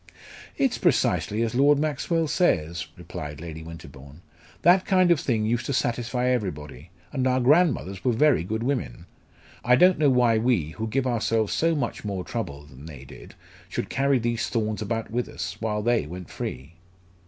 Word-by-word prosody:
"It's - - +1
precisely 110 +2 +1
as 115 - -2
Lord 140 +3 +4
Maxwell 155 +2 0
says," 85 - 0
replied 75 0 -7
Lady 80 -1 -8
Winterbourne; 80 -1 -12 0.4
"that 180 +2 +5
kind 185 -2 +3
of 170 - +4
thing 110 -6 0
used 120 +2 -1
to 140 - -1
satisfy 120 0 -1
everybody. 85 - -3 0.2
And 130 -2 0
our 130 0 +2
grandmothers 130 - +2
were 125 - +2
very 130 - +3
good 110 +5 -3
women. 125 - -3 0.6
I 125 +1 +5
don't 180 +6 +5
know 150 -2 +4
why 120 -3 +3
we, 110 -10 +1
who 110 +6 -4
give 130 +4 -1
ourselves 115 -3 0
so 165 0 +1
much 125 -6 -3
more 100 -3 -3
trouble 75 -13 -5
than 70 +1 -13
they 70 -4 -10
did, - - -13 0.3
should - - -4
carry 135 0 +2
these 120 -1 -1
thorns 110 -2 -2
about 115 +1 -3
with 120 +1 -2
us, - - -6
while 105 -2 -2
they 120 -9 +1
went 90 +2 -9
free." 65 +6 -6
115 Hz, 175 wpm, -25 LUFS, 90-130 Hz, 0.6 s, that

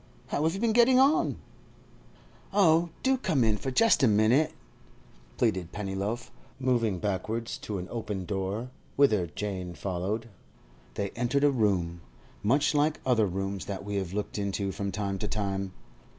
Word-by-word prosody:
How - - -1
have 160 +3 +1
you - - -4
been 225 0 +2
getting 240 +2 +6
on?' 295 +6 +3 1.1
'Oh, 170 -4 +4
do 265 0 +3
come 150 - +1
in 110 -2 +3
for 130 - -4
just 225 - +4
a 130 - +6
minute!' 110 +8 +4 0.9
pleaded 90 -2 0
Pennyloaf, 105 +4 -3 0.3
moving 120 -6 +1
backwards 105 +4 -2
to 105 - -4
an 90 0 -5
open 105 -5 -4
door, 100 +6 -3 0.2
whither 110 -11 +4
Jane 90 0 -5
followed. 100 +5 -3 0.7
They 100 -1 -2
entered 125 +4 0
a 145 - +5
room—much 100 - 0
like 150 +1 +2
other 115 -5 +3
rooms 95 +1 -3
that 100 0 -5
we 100 0 -2
have 95 -3 -2
looked 105 +1 -3
into 100 0 -1
from 100 0 -3
time 100 -2 -2
to 105 - -2
time. 100 -2 -2
105 Hz, 150 wpm, -28 LUFS, 95-135 Hz, 1.1 s, getting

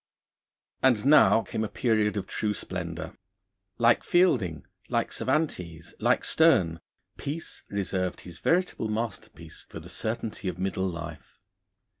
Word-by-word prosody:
And 125 -4 +3
now 140 -5 +6
came 110 - -3
a - - -1
period 110 -3 +1
of 100 - -2
true 105 -1 -2
splendour. 90 -2 -5 0.6
Like 115 0 +4
Fielding, 125 - +2 0.2
like - - 0
Cervantes, 90 - -2
like - - +2
Sterne, 90 - +4 0.4
Peace 155 +4 -5
reserved 95 -2 -2
his 85 -2 -10
veritable 175 - +1
masterpiece 110 -1 -5
for - - -8
the - - -12
certainty 110 -3 -3
of 90 -2 -3
middle 95 0 -1
life. 85 -2 -7
105 Hz, 125 wpm, -27 LUFS, 90-120 Hz, 0.6 s, now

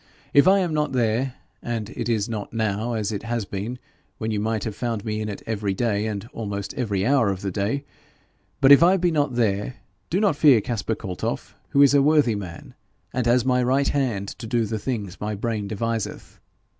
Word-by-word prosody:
If 140 +4 +6
I 195 +1 +7
am 175 -4 -1
not 150 -2 0
there 125 +2 0 0.3
and 115 -2 -4
it 120 -2 -4
is 110 -2 +1
not 110 -3 -5
now 110 +1 -1
as 110 -2 -1
it 100 - -3
has 115 -2 -2
been, 100 +6 -5 0.4
when 110 0 -3
you 105 - -1
might 110 0 -1
have 110 -3 -4
found 115 -4 -3
me 110 -1 -2
in 105 - -3
it 100 - -7
every 105 -3 -2
day, 110 -1 0
and 105 0 -4
almost 100 -3 -4
every 105 -8 -1
hour 130 -5 +3
of 95 -1 -3
the 100 - -2
day; 105 +9 -1 0.8
but 135 0 +7
if 140 - +9
I 180 +3 +6
be 175 -1 +1
not 145 -5 0
there, 110 +1 0 0.3
do 180 - +1
not 200 -7 +3
fear 145 -5 +6
Caspar 110 0 -2
Kaltoff, 95 -5 -4 0.2
who 140 - +5
is 140 - +5
a 140 - +6
worthy 145 -4 +4
man, 95 -5 -7 0.4
and 125 -2 0
as 120 +1 +3
my 125 -1 +3
right 135 +3 +2
hand 115 -9 -1
to 115 - -6
do 115 0 +1
the 110 +1 -3
things 105 -6 -4
my 105 0 -2
brain 105 -1 -2
deviseth. 115 +1 -4
115 Hz, 210 wpm, -24 LUFS, 105-130 Hz, 0.8 s, if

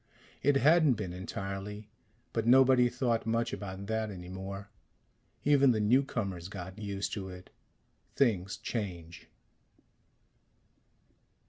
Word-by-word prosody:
It 145 0 +3
hadn't 155 0 +5
been, 100 -6 -4
entirely. 100 +3 -6 0.5
But 115 0 -1
nobody 130 -1 +6
thought 120 -2 -1
much 115 +1 0
about 100 -1 -6
that 110 +1 -1
any 90 -3 -8
more. 100 +2 -7 0.7
Even 140 -1 +5
the 110 - 0
newcomers 105 -6 0
got 95 +1 -8
used 100 -2 -3
to 95 -3 -4
it. 90 0 -11 0.6
Things 95 -8 +1
change. 90 -6 -5
105 Hz, 110 wpm, -31 LUFS, 95-120 Hz, 0.7 s, nobody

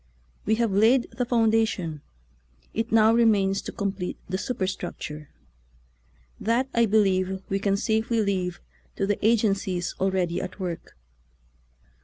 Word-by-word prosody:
We 220 - +3
have 230 -2 0
laid 225 +6 +3
the 240 +1 -3
founda 225 -2 +3
tion; 165 -7 -5 0.7
it 225 +1 -2
now 220 0 +5
remains 205 -4 +3
to - - -7
complete 195 -3 -3
the 185 +1 -2
su 250 - -3
perstructure. 175 -6 -4 1.1
That, 235 +4 +1
I 235 -1 +3
believe, 190 -2 +1
we 195 - 0
can 200 0 +1
safely 220 +2 0
leave 190 -3 -1 0.3
to 195 - 0
the 205 +1 -2
agencies 200 -5 +1
already 185 -2 0
at 190 +2 -7
work. 175 - -6
200 Hz, 135 wpm, -25 LUFS, 185-225 Hz, 1.1 s, now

